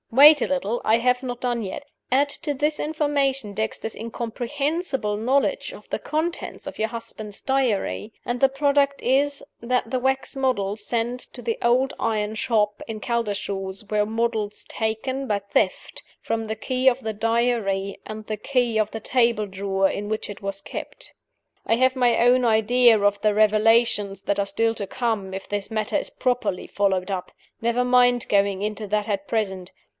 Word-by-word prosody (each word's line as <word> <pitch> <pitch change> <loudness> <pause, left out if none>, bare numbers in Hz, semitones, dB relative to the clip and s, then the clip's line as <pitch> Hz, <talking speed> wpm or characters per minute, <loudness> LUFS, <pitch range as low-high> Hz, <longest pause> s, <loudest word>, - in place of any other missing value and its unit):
Wait 290 +4 +8
a - - +1
little! 240 -4 -1
I 220 - +4
have 250 +1 +2
not 245 -1 -4
done 240 -2 0
yet. 200 +6 -5 0.3
Add 275 +3 +4
to 295 - -1
this 300 +2 0
information 280 -7 0
Dexter's 220 +1 -3
incomprehensible 245 - -2
knowledge 265 - +1
of - - -13
the - - -2
contents 320 +3 -3
of - - -7
your 220 0 0
husband's 220 -3 -7
diary, 250 -5 0
and 240 0 -2
the 270 - +5
product 280 0 +1
is 280 +3 +2 0.2
that 245 0 0
the 255 +1 0
wax 265 +2 -1
models 215 -6 0
sent 240 +2 -1
to 245 - -8
the 230 -1 -2
old 255 +3 +2
iron 215 -1 -1
shop 215 -3 0
in 220 -1 -5
Caldershaws 200 -3 -3
were 210 -1 +2
models 220 -1 -2
taken 260 +5 -2
by 210 - +1
theft 200 -1 -1 0.2
from 225 0 -2
the 220 0 -3
key 255 +4 +2
of 255 +1 -3
the 220 -2 -3
Diary 220 -3 0
and 215 0 -7
the 215 0 -3
key 245 0 0
of 215 0 +1
the 225 - -5
table 235 -2 +2
drawer 195 0 0
in 205 +2 -4
which 215 0 -3
it 205 - -8
was 195 0 -4
kept. - - -8 0.5
I 225 - +3
have 260 +2 +3
my 245 -2 +3
own 245 +2 +4
idea 230 +1 +5
of 205 0 +1
the 215 -1 +3
revelations 215 -1 +3
that 200 0 0
are 200 - 0
still 225 +3 +1
to 200 -2 -4
come 220 -5 -2
if 190 0 -6
this 205 -1 -3
matter 215 -1 -2
is - - 0
properly 245 -7 -1
followed 195 -2 0
up. 180 -1 -4 0.3
Never 235 +2 +1
mind 245 -1 +4
going 200 -1 +2
into 210 0 -3
that 210 +1 0
at 200 -2 -2
present. 190 -5 -2
225 Hz, 175 wpm, -24 LUFS, 205-255 Hz, 0.5 s, Wait